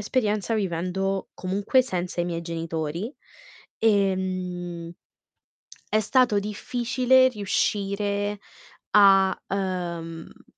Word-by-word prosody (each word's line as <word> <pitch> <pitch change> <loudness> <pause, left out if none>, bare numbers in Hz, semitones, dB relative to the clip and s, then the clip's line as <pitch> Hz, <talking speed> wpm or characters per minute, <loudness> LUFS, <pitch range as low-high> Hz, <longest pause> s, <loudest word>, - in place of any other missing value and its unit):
esperienza 210 -1 0
vivendo 190 0 -1
comunque 200 +8 +1
senza 180 -7 -3
i - - +1
miei 170 -1 -3
genitori, 165 - -4 0.7
ehm, 185 -4 0 1.0
è 215 - +3
stato 230 -1 +3
difficile 245 +5 +2
riuscire 205 -1 -1 0.5
a, 195 -2 +6
uhm 175 -4 -4
195 Hz, 80 wpm, -25 LUFS, 175-210 Hz, 1.0 s, a